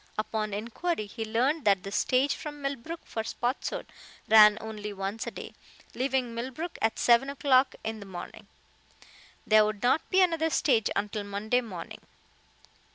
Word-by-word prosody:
Upon 215 0 -2
inquiry, 230 - -3
he 225 +2 -6
learned 255 +8 0
that 195 -3 +3
the 195 - -6
stage 260 +6 +2
from 300 -2 -7
Millbrook 280 +4 -5
for 220 - -4
Spotswood 240 +3 -3 0.4
ran 210 -1 +8
only 215 -1 -6
once 195 +3 -4
a - - 0
day, - - -9 0.4
leaving 255 -2 -1
Millbrook 260 +9 -5
at 225 0 +1
seven 240 +3 +4
o'clock 275 -2 +3
in 220 0 -4
the 200 - -10
morning. 180 -2 -9 1.0
There 215 0 +6
would 215 0 -3
not 260 +6 +3
be 380 0 +4
another 330 -2 +1
stage 240 -8 +2
until 205 +1 -2
Monday 205 +5 0
morning. 185 -8 -8
230 Hz, 155 wpm, -28 LUFS, 210-275 Hz, 1.0 s, ran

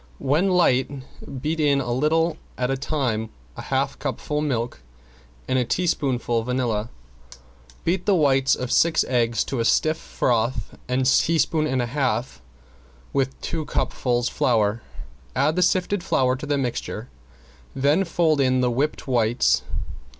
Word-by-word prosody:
When 155 +8 +1
light 135 -8 +3 0.5
beat 160 +2 -1
in 145 -2 +3
a 125 -3 -3
little 160 +4 +1 0.2
at 125 +1 0
a - - +1
time, 130 -6 -2 0.3
a - - -7
half - - -1
cupful 150 0 -3
milk 120 - -2 0.7
and 130 0 +1
a - - +2
teaspoonful 125 -6 0
vanilla. 120 -3 -1 1.0
Beat 180 +2 0
the 200 - +5
whites 135 -4 +3
of 125 -1 -4
six 170 -1 +4
eggs 120 -3 +1
to 135 - -4
a - - +1
stiff 155 +7 +2
froth 115 -2 -1
and 130 +1 +1
sift 130 - +5
a - - -2
teaspoonful 155 -2 +1
and 130 -2 +1
a 120 +1 -6
half 125 - -1 0.7
with 135 -1 -1
two 160 - -3
cupfuls 120 -4 -1
flour. 110 -2 +1 0.5
Add 155 +3 +2
the 180 - +1
sifted 180 +1 +1
flour 130 -4 +2
to 145 +3 -7
the 145 0 +1
mixture. 125 -3 -3 0.7
Then 145 +7 +3
fold 165 -4 +1
in 130 -1 +2
the 125 -1 +2
whipped 140 +6 -1
whites. 110 - +2
130 Hz, 150 wpm, -23 LUFS, 120-155 Hz, 1.0 s, the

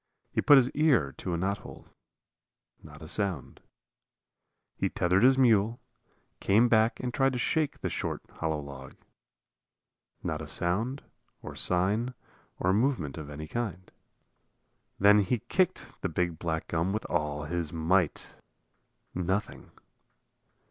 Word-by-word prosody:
He - - 0
put 145 - +7
his 130 -1 +4
ear 130 - +2
to 90 -2 -2
a - - -1
knothole. 95 +3 -4 1.0
Not 75 0 -13
a - - -9
sound. 90 - -1 1.2
He - - -1
tethered 90 +2 +1
his 130 +2 +6
mule, 115 -2 +3 0.6
came 110 +5 +4
back 110 -1 +3
and 125 -1 -3
tried 135 -1 +2
to - - -2
shake 150 +4 0
the - - -1
short, - - -3 0.2
hollow 80 -2 -1
log. 70 -2 -10 1.3
Not 80 -1 -3
a 75 - -7
sound 110 - -1 0.4
or - - -8
sign 105 +8 +1 0.4
or 90 +1 +1
movement 100 - 0
of 75 -2 -8
any 75 +1 -7
kind. 95 -4 -4 1.1
Then 105 +1 +6
he 105 +5 +1
kicked 180 - 0 0.2
the - - -1
big 85 0 -1
black 80 -2 -3
gum 85 +3 0
with 110 - -3
all 75 -3 -1
his 85 0 -3
might. 85 +1 0 0.8
Nothing. 95 +4 -3
95 Hz, 135 wpm, -29 LUFS, 80-120 Hz, 1.3 s, put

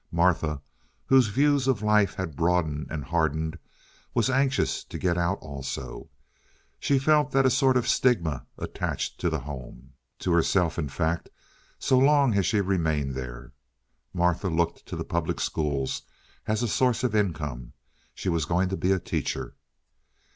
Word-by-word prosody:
Martha, 85 -4 +2 0.5
whose 130 -3 +5
views 140 +4 +2
of 120 -6 +1
life 105 -2 +3
had 90 -6 -4
broadened 80 -2 0
and 75 -2 -4
hardened, 80 +1 -1 0.6
was 115 +2 +2
anxious 135 0 +1
to - - -8
get 90 -2 +1
out 85 +3 0
also. 65 -4 -6 0.7
She 140 - +2
felt 150 +2 +3
that 135 0 +4
a 130 - +5
sort 130 -1 +3
of 125 - 0
stigma 85 - +1
attached - - -3
to 85 - +1
the 80 - -1
home—to 65 +4 -8
herself, 85 0 +2
in 75 -4 -2
fact, 80 +4 -1 0.5
so 130 -2 +3
long 140 -2 +4
as 100 -3 +2
she 105 - +2
remained 80 -8 0
there. 65 -1 -7 0.6
Martha 90 +2 +1
looked 85 +1 -1
to - - -5
the - - -4
public 85 -1 -2
schools 70 -4 -1 0.5
as 110 +2 0
a - - +1
source 125 +2 +1
of 125 -4 +1
income; 75 - -2 0.4
she - - -6
was 85 -4 +1
going 90 +4 +1
to 95 - -2
be 95 - +1
a 95 - +4
teacher. 85 - -3
85 Hz, 155 wpm, -26 LUFS, 75-115 Hz, 0.7 s, whose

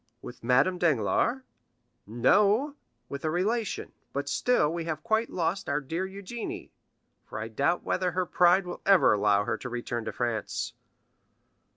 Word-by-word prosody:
"With 120 - -10
Madame 135 +10 +3
Danglars?" 160 - +1 0.6
"No, 205 - +3 0.3
with 140 - -7
a 155 - 0
relation. 210 +6 -1 0.2
But 140 +1 -3
still, 160 - +2
we 170 -1 -3
have 155 -2 -4
quite 225 0 +1
lost 180 +2 -2
our 140 +1 +1
dear 165 +7 -3
Eugénie; 200 +4 -7 0.5
for - - -9
I 110 +1 -4
doubt 140 +9 0
whether 185 - 0
her 185 +1 0
pride 180 +2 +4
will 175 - -7
ever 195 - +5
allow 105 -1 +3
her 110 - -2
to 125 - -6
return 120 -1 -4
to - - -3
France." 120 -3 -3
170 Hz, 155 wpm, -28 LUFS, 120-195 Hz, 0.6 s, ever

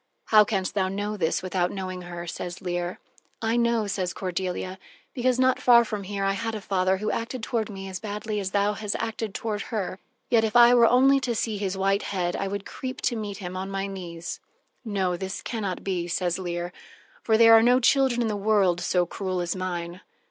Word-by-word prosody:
"How 215 -1 +8
canst 195 -3 -2
thou 190 -2 +1
know 205 +2 -3
this 170 -3 0
without 180 -1 0
knowing 185 -1 -5
her?" 175 -1 -7
says 175 +1 -6
Leir. 175 -1 -3 0.4
"I 225 0 0
know," 235 -2 +2
says 185 -3 -2
Cordelia, 185 0 -3 0.3
"because 250 -1 +1
not 260 0 +3
far 235 -1 +6
from 210 -3 -4
here, 200 0 -3
I 195 - +2
had 220 +3 -3
a - - -3
father 190 -1 +1
who 215 +2 -2
acted 230 +1 -4
toward 225 -3 -1
me 195 -1 -7
as 190 -1 -5
badly 210 0 -4
as 195 -2 -2
thou 200 +1 +1
hast 210 0 -3
acted 225 -2 -4
toward 210 -2 -2
her, 195 -4 -3 0.3
yet, 230 -2 +3
if 220 0 -1
I 240 0 +8
were 235 -1 +6
only 270 +3 +5
to 240 -2 -2
see 220 -2 -2
his 195 -1 -2
white 195 +1 +2
head, 180 -3 -2
I 195 - -2
would 200 0 -4
creep 260 0 -6
to 240 - 0
meet 210 -3 -4
him 185 -2 -6
on 190 +1 -4
my 195 0 -2
knees." 175 -4 -6 0.4
"No, 195 -5 -1
this 190 +2 -5
can 230 -3 -4
not 190 -3 -3
be," 180 -3 -2
says 175 0 -1
Leir, 175 -1 -4 0.5
"for 220 -1 +3
there 225 0 +8
are 225 - +8
no 245 +2 +5
children 260 -1 +3
in - - 0
the 215 - -1
world 200 -4 +2
so 180 0 +2
cruel 185 +1 -3
as 175 0 -2
mine." 175 -1 -4
195 Hz, 215 wpm, -26 LUFS, 185-225 Hz, 0.5 s, How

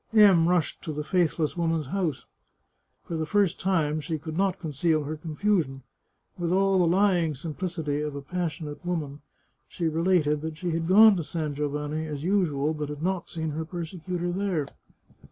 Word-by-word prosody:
M 195 -6 +6
rushed 175 -4 0
to 160 - -5
the 150 0 -3
faithless 165 -2 +1
woman's 165 -3 0
house. 165 -1 -2 0.8
For 170 - -5
the 160 -1 -2
first 200 -1 +2
time 155 -5 +1
she 160 +1 -3
could 155 +1 -7
not 195 +1 +1
conceal 155 0 0
her 150 +2 -4
confusion. 155 -3 -1 0.6
With 170 -1 -1
all 195 0 +3
the 175 - +4
lying 175 -4 +3
simplicity 160 0 -3
of 150 -1 -3
a 140 - -5
passionate 160 -1 -4
woman, 150 -5 -3 0.5
she 170 - -2
related 160 -2 +2
that 160 0 -5
she 175 +1 -2
had 165 0 -1
gone 210 +3 +8
to 170 - -2
San 155 -1 -3
Giovanni 150 +2 -2
as 145 -2 -5
usual, 160 -6 +1
but 150 -1 -4
had 150 +1 -6
not 185 -1 -1
seen 160 -1 -3
her 160 +2 -3
persecutor 175 +1 -4
there. 185 -5 -1
165 Hz, 170 wpm, -27 LUFS, 150-180 Hz, 0.8 s, gone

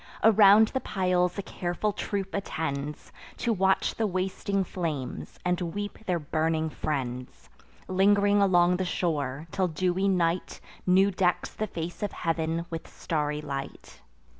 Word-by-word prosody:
Around 215 0 +7
the 265 - -1
piles 180 -4 0
a 200 - -2
careful 190 +2 -2
troop 195 -1 -3
attends, 150 -6 -4 0.3
To 235 - 0
watch 190 -1 +2
the 225 - 0
wasting 190 +1 -1
flames, 160 -8 -4
and 180 0 +1
weep 205 +4 -4
their 180 -2 +2
burning 160 +1 -1
friends; 125 -5 -4 0.4
Ling'ring 200 +2 +4
along 180 -2 +4
the 190 - -1
shore, 150 -6 -2
till 190 -2 +1
dewy 180 +3 0
night 175 -2 0 0.3
New 190 +2 +5
decks 180 -2 0
the 215 - -3
face 170 -2 -6
of 205 - -2
heav'n 165 0 -1
with 165 -1 -5
starry 150 -2 -2
light. 140 -2 -7
180 Hz, 140 wpm, -27 LUFS, 160-195 Hz, 0.4 s, Around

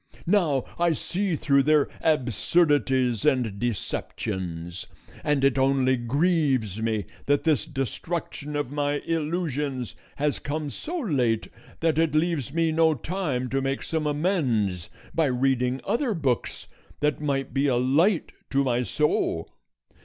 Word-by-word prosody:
Now 165 -9 +2 0.2
I 170 -1 +3
see 185 +3 -1
through 140 -2 +3
their 150 0 +4
absurdities 135 - +2
and 125 -9 +1
deceptions, 90 -6 -4 0.4
and 145 -2 +1
it 135 -1 +3
only 130 -1 +3
grieves 130 - +1
me 110 -3 0 0.2
that 145 0 +2
this 155 -1 +2
destruction 150 +1 -4
of 145 -3 -2
my 145 0 0
illusions 150 -6 -2 0.2
has 145 0 0
come 150 0 -3
so 345 - -5
late 130 - 0 0.3
that 160 -1 +2
it 160 -2 +2
leaves 155 -5 +1
me 165 +1 +1
no 160 0 +3
time 150 -4 -2
to 135 +2 0
make 135 0 -2
some 160 -2 -1
amends 130 - 0 0.2
by 165 - +2
reading 130 0 +1
other 235 -2 0
books 135 -7 -1 0.4
that 150 0 +1
might 135 -3 -1
be 140 +2 +2
a 130 - +2
light 155 - +2 0.2
to 140 0 +2
my 125 -2 +1
soul. 150 +4 0
145 Hz, 135 wpm, -26 LUFS, 125-160 Hz, 0.4 s, their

